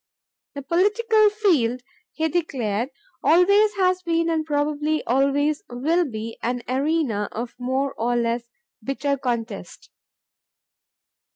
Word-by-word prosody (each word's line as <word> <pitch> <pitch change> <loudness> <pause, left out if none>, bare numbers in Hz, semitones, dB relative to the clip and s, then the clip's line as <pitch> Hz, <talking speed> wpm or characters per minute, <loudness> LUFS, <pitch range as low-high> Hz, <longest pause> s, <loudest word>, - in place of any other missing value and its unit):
"The 280 - -6
political 420 - +3
field," 315 - +1 0.3
he 320 0 0
declared, 255 -9 -1 0.3
"always 400 +5 +4
has 370 -1 +2
been 335 -1 0
and 320 -1 0
probably 300 0 -1
always 280 +4 +1
will 310 +9 +1
be 225 0 -6
an 245 +1 -2
arena 265 -6 0
of 235 +2 -5
more 265 +2 -1
or 240 +2 +1
less 235 0 0 0.4
bitter 280 +3 -1
contest. 230 -8 -5
285 Hz, 110 wpm, -23 LUFS, 245-335 Hz, 0.4 s, always